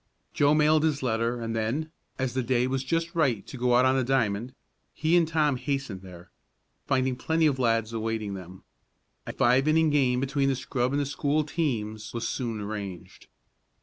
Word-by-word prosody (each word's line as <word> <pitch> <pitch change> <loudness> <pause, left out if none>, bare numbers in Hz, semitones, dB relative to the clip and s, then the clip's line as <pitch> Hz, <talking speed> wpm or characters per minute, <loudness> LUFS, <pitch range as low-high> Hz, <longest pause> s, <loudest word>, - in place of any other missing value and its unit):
Joe 145 +1 +3
mailed 155 0 +4
his 150 -4 0
letter 115 0 0
and 115 -1 -3
then, 125 +9 -2 0.3
as 130 -2 -2
the 130 - 0
day 125 0 +1
was 130 0 -1
just 165 +4 -1
right 130 -11 +1
to - - -9
go 125 -1 +2
out 125 +1 +5
on 130 0 +3
the 130 - +2
diamond, 120 -1 0 0.4
he 160 +3 +2
and 170 -2 +4
Tom 150 -4 +1
hastened 135 -6 -3
there, 90 -2 -13 0.6
finding 130 -2 +1
plenty 160 +5 +1
of 140 -4 +2
lads 115 -2 +1
awaiting 110 -2 -2
them. 95 -1 -10 0.6
A - - -3
five 130 +4 +3
inning 160 0 +3
game 130 -4 +2
between 135 +1 0
the 135 - +1
scrub 125 0 -1
and 145 -1 0
school 145 +2 0
teams 115 -9 -3
was 115 -1 -2
soon 115 -4 -3
arranged. 100 -4 -7
130 Hz, 180 wpm, -27 LUFS, 115-145 Hz, 0.6 s, out